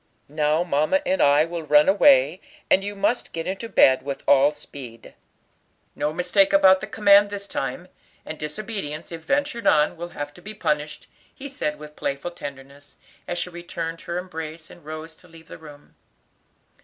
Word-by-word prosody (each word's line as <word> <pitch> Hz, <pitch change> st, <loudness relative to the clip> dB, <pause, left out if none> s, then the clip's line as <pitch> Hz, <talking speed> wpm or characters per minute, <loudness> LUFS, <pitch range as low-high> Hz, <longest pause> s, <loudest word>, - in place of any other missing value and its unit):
Now 150 Hz, +2 st, +1 dB
mamma 155 Hz, -, +1 dB
and 280 Hz, +1 st, +1 dB
I 145 Hz, +2 st, +5 dB
will 170 Hz, 0 st, -5 dB
run 150 Hz, -1 st, +4 dB
away, 185 Hz, -4 st, +4 dB, 0.3 s
and 190 Hz, -, +5 dB
you 205 Hz, +1 st, -5 dB
must 235 Hz, +5 st, -1 dB
get 165 Hz, 0 st, -4 dB
into 195 Hz, +5 st, -4 dB
bed 130 Hz, -9 st, +5 dB
with 140 Hz, 0 st, -6 dB
all 140 Hz, 0 st, +6 dB
speed. 125 Hz, -6 st, -10 dB, 0.8 s
No 150 Hz, +1 st, -1 dB
mistake 180 Hz, +4 st, +2 dB
about 190 Hz, -1 st, +6 dB
the 195 Hz, -, -5 dB
command 205 Hz, -1 st, +5 dB
this 200 Hz, -1 st, -6 dB
time, 180 Hz, -2 st, -4 dB, 0.4 s
and 155 Hz, -, -7 dB
disobedience, 155 Hz, -1 st, -5 dB
if 165 Hz, -1 st, -7 dB
ventured 280 Hz, -, -1 dB
on, 150 Hz, 0 st, +3 dB
will 175 Hz, +1 st, -7 dB
have 145 Hz, 0 st, -5 dB
to 175 Hz, -, -15 dB
be 215 Hz, +4 st, -9 dB
punished," 150 Hz, -6 st, -2 dB, 0.3 s
he 275 Hz, -, -8 dB
said 150 Hz, -, -3 dB
with 150 Hz, 0 st, -12 dB
playful 140 Hz, +5 st, -4 dB
tenderness, 140 Hz, -2 st, -11 dB, 0.3 s
as 175 Hz, 0 st, -2 dB
he 180 Hz, -, -10 dB
returned 170 Hz, -1 st, -6 dB
her 170 Hz, -, -5 dB
embrace, 160 Hz, -3 st, -7 dB
and 175 Hz, -, -16 dB
rose 155 Hz, +1 st, -8 dB
to 180 Hz, -, -18 dB
leave 165 Hz, -1 st, -16 dB
the -, -, -10 dB
room. 150 Hz, -2 st, -15 dB
165 Hz, 175 wpm, -23 LUFS, 150-195 Hz, 0.8 s, all